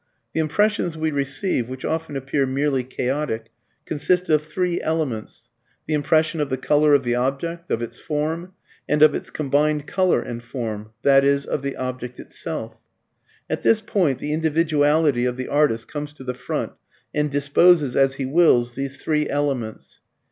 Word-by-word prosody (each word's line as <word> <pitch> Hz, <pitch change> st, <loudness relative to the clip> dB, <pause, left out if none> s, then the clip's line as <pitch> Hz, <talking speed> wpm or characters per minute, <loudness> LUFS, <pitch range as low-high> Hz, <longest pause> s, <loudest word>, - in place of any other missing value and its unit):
The -, -, -1 dB
impressions 175 Hz, +1 st, +1 dB
we 160 Hz, 0 st, 0 dB
receive, 140 Hz, -, -1 dB
which 130 Hz, 0 st, -6 dB
often 160 Hz, -2 st, -2 dB
appear 135 Hz, +1 st, 0 dB
merely 135 Hz, 0 st, 0 dB
chaotic, 130 Hz, -2 st, -3 dB, 0.3 s
consist 180 Hz, +4 st, +1 dB
of 155 Hz, -1 st, +4 dB
three 175 Hz, +3 st, -1 dB
elements: 150 Hz, -9 st, -3 dB, 0.4 s
the 155 Hz, -, -2 dB
impression 155 Hz, +2 st, +2 dB
of 145 Hz, -, -1 dB
the 130 Hz, -, -1 dB
colour 150 Hz, +2 st, +4 dB
of 140 Hz, -, +2 dB
the 120 Hz, -1 st, 0 dB
object, 140 Hz, +8 st, -2 dB
of 115 Hz, -, -1 dB
its 120 Hz, +1 st, -7 dB
form, 160 Hz, +4 st, -3 dB, 0.4 s
and 150 Hz, +1 st, +4 dB
of 155 Hz, -, +7 dB
its -, -, -4 dB
combined 150 Hz, +1 st, 0 dB
colour 185 Hz, +2 st, +2 dB
and 120 Hz, 0 st, -6 dB
form, 110 Hz, -4 st, -5 dB, 0.2 s
i.e. 140 Hz, 0 st, +5 dB
of 150 Hz, -, -2 dB
the 140 Hz, 0 st, -3 dB
object 125 Hz, -1 st, -5 dB
itself. -, -, -5 dB, 0.7 s
At -, -, -2 dB
this 225 Hz, -, +4 dB
point 175 Hz, -, +1 dB
the 150 Hz, -, -3 dB
individuality 155 Hz, -4 st, +2 dB
of 125 Hz, 0 st, -1 dB
the 130 Hz, -, -4 dB
artist 145 Hz, -6 st, +2 dB
comes 145 Hz, -1 st, -6 dB
to 140 Hz, -, -12 dB
the 125 Hz, -1 st, -3 dB
front 125 Hz, -, -3 dB, 0.4 s
and 150 Hz, 0 st, +1 dB
disposes, 145 Hz, +1 st, +4 dB
as 135 Hz, -1 st, +3 dB
he 135 Hz, -, -3 dB
wills, 130 Hz, -5 st, +3 dB
these 135 Hz, +2 st, -4 dB
three 150 Hz, -1 st, 0 dB
elements. 135 Hz, -6 st, -3 dB
145 Hz, 165 wpm, -22 LUFS, 130-155 Hz, 0.7 s, of